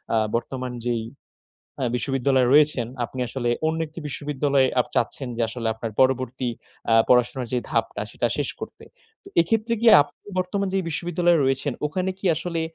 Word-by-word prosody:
আ - - +4 0.2
বর্তমান 130 +1 -3
যেই 120 -2 0 0.8
অ্যা 130 - 0
বিশ্ববিদ্যালয়ে 130 0 +1
রয়েছেন, 145 -5 +4 0.2
আপনি 130 - -8
আসলে 120 -1 -1 0.2
অন্য 160 +1 0
একটি 155 +2 -10
বিশ্ববিদ্যালয়ে 140 -2 +1
আপ - - 0
চাচ্ছেন 125 +3 -1
যে 120 - 0
আসলে 115 0 -5
আপনার 110 0 -5
পরবর্তী 130 -1 +1 0.4
আ - - +6
পড়াশোনার 125 +1 +3
যেই 125 -1 0
ধাপটা - - -1
সেটা - - -1
শেষ - - -1
করতে। - - -8 0.4
তো - - -11
এক্ষেত্রে 225 +7 +1
কি 235 - 0 0.2
আপনি 145 - -18 0.2
বর্তমান 190 +2 -1
যেই 190 -1 0
বিশ্ববিদ্যালয়ে 170 +1 +1
রয়েছেন, 135 +1 0
ওখানে 185 +5 -2
কি 195 - -4
আসলে 170 +1 -3
135 Hz, 165 wpm, -24 LUFS, 125-165 Hz, 0.8 s, আ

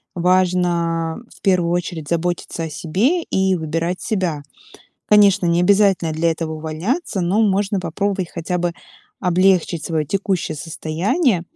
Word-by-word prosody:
важно 175 -2 +1 0.2
в - - -21
первую 180 -4 +2
очередь 175 -3 -3
заботиться 170 0 -2
о 160 - -4
себе 185 - 0
и 190 -1 +1
выбирать 165 +2 -2
себя. 185 -9 -1 0.7
Конечно, 200 -2 +5
необязательно 180 0 +3
для 165 +2 +1
этого 160 -1 -3
увольняться, 165 - -3
но 185 +6 +2
можно 200 -1 +1
попробовать 185 +1 -2
хотя 175 +1 -3
бы 175 0 -1 0.5
облегчить 180 -2 +2
своё 155 -3 -1
текущее 190 -4 -1
состояние. 175 - 0
175 Hz, 125 wpm, -20 LUFS, 165-195 Hz, 0.7 s, Конечно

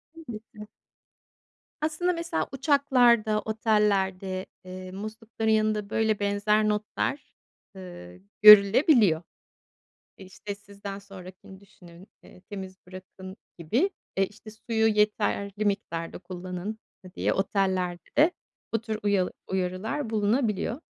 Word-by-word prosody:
Elbette. 220 -8 -10 1.1
Aslında 320 +4 0
mesela 335 - -2
uçaklarda, 250 -6 +3
otellerde, 200 -4 0 0.2
eee, 185 0 -8
muslukların 220 +3 -4
yanında, 215 -1 +1
böyle, 220 -1 +1
benzer 205 +1 +1
notlar, 215 +6 -2 0.5
ııı, 90 - -10 0.2
görülebiliyor. 210 - +7 1.0
İşte, 195 +2 -8
"Sizden 200 0 -9
sonrakini 190 -1 -12
düşünün." 180 -2 -17 0.2
eee, - - -17
"Temiz 190 -2 -7
bırakın." 185 +1 -11 0.2
gibi. 225 - +1 0.3
E, 195 - +4
işte, 215 +2 -14
"Suyu 220 0 0
yeterli 210 -1 0
miktarda 170 -5 -2
kullanın." 185 +3 -6 0.3
ııı, 180 - -13
diye - - 0
otellerde 190 - +1 0.4
bu 225 - +1
tür 220 -2 -4
uyal 200 -3 +2 0.2
uyarılar 190 +9 -2
bulunabiliyor. 220 +2 0
205 Hz, 100 wpm, -27 LUFS, 185-220 Hz, 1.1 s, görülebiliyor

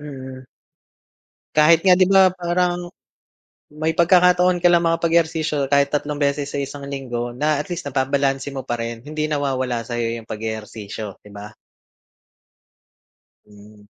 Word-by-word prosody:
mhm. 130 -3 -9 1.1
Kahit 160 +2 +5
nga 185 -1 +5
di 185 - +5
ba, 190 -1 +5
parang, 175 0 -1 0.9
may 155 +2 -1
pagkakataon 180 0 +4
ka - - +8
lang 170 0 +3
mga 165 0 +1
pag-ehersisyo 160 -3 +1
kahit 140 0 +3
tatlong 145 0 -2
beses 140 0 +1
sa 140 - -3
isang 140 0 -6
linggo 120 -3 -4
na 150 +3 +1
at - - -6
least 170 0 -5
nababalanse 135 0 0
mo 135 - -4
pa 120 - -1
rin 115 0 -5
hindi 155 +3 -4
nawawala 135 -5 -1
sayo 115 0 -3
yung 115 -1 -8
pag-eehersisyo 110 -1 -6
'di 105 - -14
ba? 105 +1 -10 1.9
Hmm. 105 0 -17
140 Hz, 140 wpm, -21 LUFS, 120-165 Hz, 1.9 s, ka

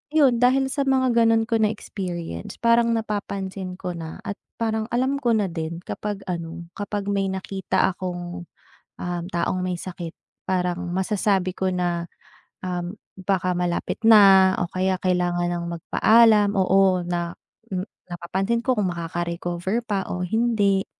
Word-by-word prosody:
'yon 265 -6 +5
dahil 265 +2 +3
sa 280 -2 -1
mga 260 -1 +3
gano'n 225 -1 +4
ko 225 0 0
na 215 - +4
experience 175 - -5
parang 235 0 +4
napapansin 195 -4 -4
ko 180 -1 -5
na 165 -2 -7
at 200 - -5 0.2
parang 220 -1 -1
alam 260 +4 0
ko 240 -4 +2
na 200 -4 0
din 165 +1 -5
kapag 205 -1 -5
ano 170 0 -5 0.2
kapag 205 0 -2
may 195 -1 +1
nakita 190 0 0
akong, 175 -1 -6 0.5
um, 175 -1 -3
taong 180 +1 0
may 180 - -1
sakit 175 -3 -6 0.3
parang 180 -1 -1
masasabi 190 -1 0
ko 190 -1 0
na, 175 -1 -1 0.6
um, 180 0 -3 0.2
baka 185 -1 0
malapit 175 -1 -1
na 195 -4 +8
o 175 - -3
kaya 185 +1 +1
kailangan 175 -1 +1
ng 170 - -4
magpaalam, 210 +4 +4
oo, 190 -1 +3
na 175 -1 -3 0.8
napapansin 190 +7 -1
ko 260 - +3
kung 205 - +2
maka-recover 175 +4 -2
pa 200 -3 -2
o 180 - -2
hindi. 205 -1 +1
190 Hz, 145 wpm, -24 LUFS, 175-220 Hz, 0.8 s, na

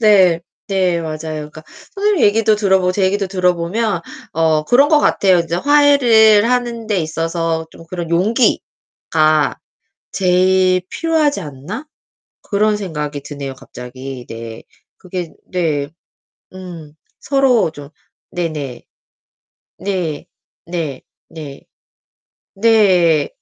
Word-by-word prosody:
네. 190 -6 +5 0.3
네 185 -3 +1
맞아요. 155 -1 -5 0.3
그러니까 155 - -11 0.3
선생님 405 -3 +2
얘기도 215 +1 +3
들어보고 190 -3 +2
제 195 - -1
얘기도 195 +1 0
들어보면 180 +2 0 0.3
어 160 -1 +1
그런 275 - +4
것 305 - +5
같아요. 190 -9 +3
이제 170 0 -3
'화해를 240 -6 +5
하는 240 -2 -1
데 210 -3 0
있어서 165 0 -2
좀 165 - -14
그런 170 -2 -5
용기가 170 -5 +1 0.6
제일 185 0 +2
필요하지 320 -3 0
않나?' 150 - -7 0.6
그런 210 +1 +1
생각이 150 -7 -5
드네요. 140 -1 -7
갑자기 130 0 -9
네. 115 0 -8 0.4
그게 180 -3 -6 0.2
네. 155 -5 -1 0.7
음. 170 -5 -10 0.3
서로 260 - +2
좀 145 -2 -12 0.4
네네. 155 -7 -4 1.0
네. 180 -6 -3 0.4
네. 165 -5 -4 0.3
네. 150 -4 -10 0.9
네. 190 -8 +3
180 Hz, 215 characters per minute, -17 LUFS, 155-215 Hz, 1.0 s, 네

